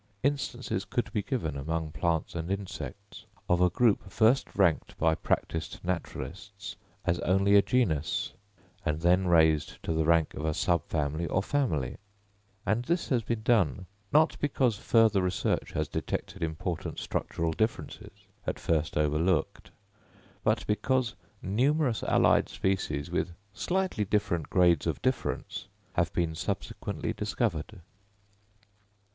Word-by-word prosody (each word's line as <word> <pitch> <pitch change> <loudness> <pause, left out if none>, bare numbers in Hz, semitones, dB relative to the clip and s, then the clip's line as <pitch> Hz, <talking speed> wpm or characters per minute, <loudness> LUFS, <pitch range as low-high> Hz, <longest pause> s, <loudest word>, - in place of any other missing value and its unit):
Instances 130 -7 -1
could 120 - -2
be 105 - +1
given 95 - -2
among 80 +3 -2
plants 85 0 -1
and 85 +1 -4
insects, 100 +2 -6 0.2
of 90 0 +3
a 90 - +5
group 105 -1 +2
first 110 +6 +4
ranked 85 -6 +2
by 80 0 +3
practised 80 +1 -2
naturalists 90 +3 -5 0.3
as 85 0 +1
only 95 +2 +3
a 100 - +8
genus, 85 - 0 0.5
and 75 -1 -1
then 90 +2 +4
raised 80 -3 +3
to 80 - -1
the 80 0 +1
rank 80 -1 +3
of 75 - -6
a 80 -1 0
subfamily 80 -2 0
or 95 - +1
family; 105 - 0 0.7
and 110 +4 +1
this 170 +4 0
has 125 -4 +2
been 115 0 -3
done, 95 - +2 0.3
not 155 +3 +4
because 130 -5 +2
further 110 -1 +4
research 90 0 -1
has - - 0
detected - - -4
important 80 +1 -3
structural 80 0 -2
differences, 110 +8 -3 0.2
at - - -1
first 80 -2 0
overlooked, 75 +4 +1 0.7
but - - +1
because 125 +3 +1 0.3
numerous 125 +4 +2
allied - - +4
species, 90 -5 -1
with 90 -1 -1 0.2
slightly 185 - 0
different 100 -6 0
grades 90 -4 +4
of - - -1
difference, - - -2 0.3
have - - +1
been 85 -2 0
subsequently 80 - -3
discovered. 80 +3 -2
90 Hz, 130 wpm, -29 LUFS, 80-110 Hz, 0.7 s, a